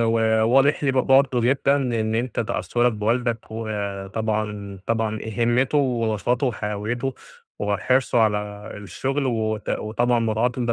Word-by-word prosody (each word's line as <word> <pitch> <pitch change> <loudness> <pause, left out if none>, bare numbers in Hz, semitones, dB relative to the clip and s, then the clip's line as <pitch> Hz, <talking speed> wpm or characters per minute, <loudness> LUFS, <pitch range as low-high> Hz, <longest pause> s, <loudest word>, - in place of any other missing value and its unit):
وواضح 115 +5 +3
لي 140 - +3
ب - - -6
برضه 135 -1 +4
جدًا 135 +3 +2
إن 115 -5 -1
أنت 120 +1 -1
تأثُّرك 120 +1 0
بوالدك 115 +2 0
وطبعًا 105 -1 -3
طبعًا 110 -1 0
آآ، 110 +1 -1
هِمتُّه 125 +5 +2
ونشاطُه 120 -1 0
وحيويتُه، 115 +3 -3 0.4
وحرصُه 120 +5 +1
على 105 -1 -1
الشغل، 135 +7 -3
و 110 -3 0
ت 105 - -12
وطبعًا 120 +3 0
مراعاة 115 +2 +1
إن 120 - -1
ده 115 - +2
115 Hz, 135 wpm, -23 LUFS, 110-125 Hz, 0.4 s, برضه